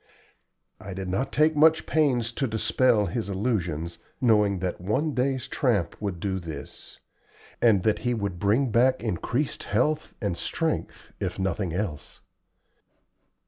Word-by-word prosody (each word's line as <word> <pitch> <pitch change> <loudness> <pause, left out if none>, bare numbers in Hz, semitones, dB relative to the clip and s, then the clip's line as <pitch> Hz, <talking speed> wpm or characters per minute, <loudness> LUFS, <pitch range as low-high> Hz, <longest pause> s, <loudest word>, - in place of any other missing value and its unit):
I 95 -1 -8
did 95 -1 -4
not 120 +9 -1
take 155 +1 +3
much 160 +2 +5
pains 125 -7 +2
to 135 +3 -1
dispel 110 0 +2
his 115 -1 -3
illusions, 90 -6 -2 0.2
knowing 105 -5 +3
that 90 -1 -3
one 140 - 0
day's 130 0 0
tramp 105 - 0
would 100 -4 -3
do 95 +1 -2
this, 85 -3 -9 0.6
and 105 -6 +4
that 110 - +2
he 120 -1 0
would 100 -5 -3
bring 110 +6 +2
back 130 +2 +3
increased 120 - -2
health 135 +9 0
and 100 -5 -1
strength - - -3
if - - -3
nothing 95 -1 -1
else. 85 -5 -4
110 Hz, 140 wpm, -26 LUFS, 95-125 Hz, 0.6 s, much